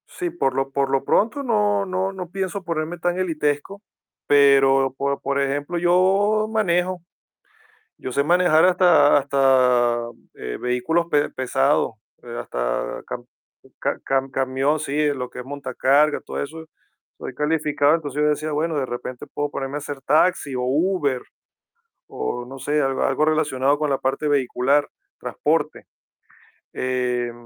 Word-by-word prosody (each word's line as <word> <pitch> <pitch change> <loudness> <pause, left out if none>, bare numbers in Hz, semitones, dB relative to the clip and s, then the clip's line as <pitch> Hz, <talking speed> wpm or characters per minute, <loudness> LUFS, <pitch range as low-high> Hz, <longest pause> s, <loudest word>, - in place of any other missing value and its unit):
Sí, 355 -3 -4
por 330 - -1
lo 135 0 -1
por 135 0 0
lo 135 0 +1
pronto, 280 +7 +1
no 210 -4 +1
no 190 0 -2
no 180 -3 -7
pienso 190 +1 -4
ponerme 165 0 -3
tan 175 +1 -1
elitesco. 160 +1 -2 0.5
Pero, 135 -2 +4
por 140 0 -2
por 140 0 -1
ejemplo, 145 +5 -2
yo 190 +5 +2
manejo. 185 -4 0 1.0
Yo 130 - -7
sé 140 - +2
manejar, 175 -1 +4
hasta 180 -5 +5
hasta, 130 -4 +3 0.4
eh, - - -6
vehículos 125 +8 0
pe-pesados, 135 -1 +1 0.3
eh, 120 -1 -8
hasta - - -3
ca-ca-cam-camión. 135 +2 -3
Sí, 150 +1 0
lo 125 -2 -5
que - - -11
es 125 - -6
montacargas, 140 +2 +1
todo - - -4
eso. 160 +3 -7 0.5
Soy - - -7
calificado. 150 0 +1
Entonces, 150 -3 -3
yo 150 - +3
decía: 150 +1 -1
"Bueno, 155 +2 -1
de 135 - 0
repente, 120 0 -6
puedo 145 0 -2
ponerme 135 0 -4
a - - -1
hacer 145 -1 -7
taxi 150 -1 +2
o 125 - -2
Uber, 145 0 0 0.9
o 125 0 -4
no 135 +2 -10
sé, 150 +3 0
algo 135 -1 0
algo 135 +3 +1
relacionado 145 -3 +1
con 150 0 -1
la 135 - 0
parte 135 +3 -1
vehicular, 140 0 +1 0.3
transporte". - - -1 0.9
Eh, 125 -1 -1
145 Hz, 140 wpm, -22 LUFS, 135-170 Hz, 1.0 s, hasta